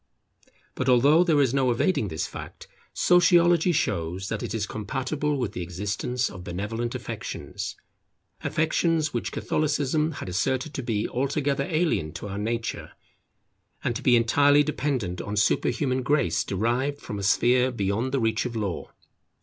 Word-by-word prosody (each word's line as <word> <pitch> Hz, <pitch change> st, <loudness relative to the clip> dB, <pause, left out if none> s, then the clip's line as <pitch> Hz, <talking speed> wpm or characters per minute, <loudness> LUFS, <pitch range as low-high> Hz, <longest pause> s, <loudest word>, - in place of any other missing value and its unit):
But 130 Hz, -, -1 dB
although 140 Hz, +7 st, +5 dB
there 160 Hz, -5 st, +3 dB
is 135 Hz, -3 st, +3 dB
no 135 Hz, -2 st, +2 dB
evading 120 Hz, -, +1 dB
this 80 Hz, -3 st, -3 dB
fact, -, -, -9 dB, 0.2 s
Sociology 175 Hz, -1 st, +4 dB
shows 95 Hz, -, -1 dB
that 110 Hz, -, -3 dB
it -, -, -4 dB
is 110 Hz, -2 st, -1 dB
compatible 135 Hz, +8 st, -2 dB
with 125 Hz, -5 st, -2 dB
the 90 Hz, -, -5 dB
existence 100 Hz, +8 st, -2 dB
of 95 Hz, -3 st, -9 dB
benevolent 110 Hz, +7 st, -3 dB
affections, -, -, -5 dB, 0.7 s
affections 160 Hz, -1 st, +1 dB
which -, -, -2 dB
Catholicism 150 Hz, +1 st, 0 dB
had -, -, -7 dB
asserted 125 Hz, -, -1 dB
to -, -, -3 dB
be 110 Hz, -4 st, -1 dB
altogether 140 Hz, +1 st, -1 dB
alien 155 Hz, -, 0 dB
to -, -, -6 dB
our 100 Hz, +1 st, -4 dB
nature, 115 Hz, +2 st, -3 dB, 0.9 s
and 120 Hz, -, -1 dB
to -, -, -4 dB
be 125 Hz, -, +5 dB
entirely 145 Hz, +5 st, +4 dB
dependent 130 Hz, -12 st, -2 dB
on 100 Hz, -, -4 dB
superhuman 130 Hz, +6 st, +1 dB
Grace 105 Hz, -, +1 dB
derived 120 Hz, +8 st, -1 dB
from 105 Hz, -, -6 dB
a -, -, -4 dB
sphere 125 Hz, +6 st, +3 dB
beyond 110 Hz, +3 st, -1 dB
the 135 Hz, -, +1 dB
reach 110 Hz, -1 st, +1 dB
of 120 Hz, -, -8 dB
Law. 100 Hz, -5 st, -3 dB
125 Hz, 150 wpm, -26 LUFS, 105-145 Hz, 0.9 s, although